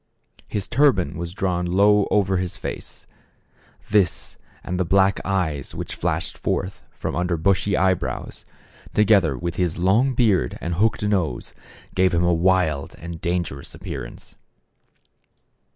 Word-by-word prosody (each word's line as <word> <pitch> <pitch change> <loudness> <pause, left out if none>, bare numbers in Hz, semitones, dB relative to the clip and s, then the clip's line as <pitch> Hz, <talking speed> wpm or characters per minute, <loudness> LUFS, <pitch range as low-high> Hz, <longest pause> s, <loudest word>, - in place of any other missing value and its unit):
His 100 -3 -3
turban 120 - +2
was 85 +1 -5
drawn 90 -2 -1
low 100 +3 +4
over 95 -2 +2
his 90 -1 -2
face; - - -7 0.9
this 100 -5 +1 0.3
and 90 0 -3
the - - +3
black 95 +2 +3
eyes 85 -8 -2
which - - -5
flashed - - -2
forth 95 +1 -2
from - - -5
under 90 0 0
bushy 95 +4 +1
eyebrows, 95 -1 -1 0.5
to 105 - +5
gether 95 - +3
with 85 +6 -4
his 90 -3 0
long 110 +9 +2
beard 105 - +2
and 85 - -3
hooked 110 +5 +1
nose, 100 -6 -1 0.4
gave 95 -1 +2
him 85 - +2
a 85 0 +3
wild 85 -5 +1
and 85 0 -8
dangerous 85 -6 -3
appearance. - - -8
95 Hz, 135 wpm, -23 LUFS, 85-100 Hz, 0.9 s, to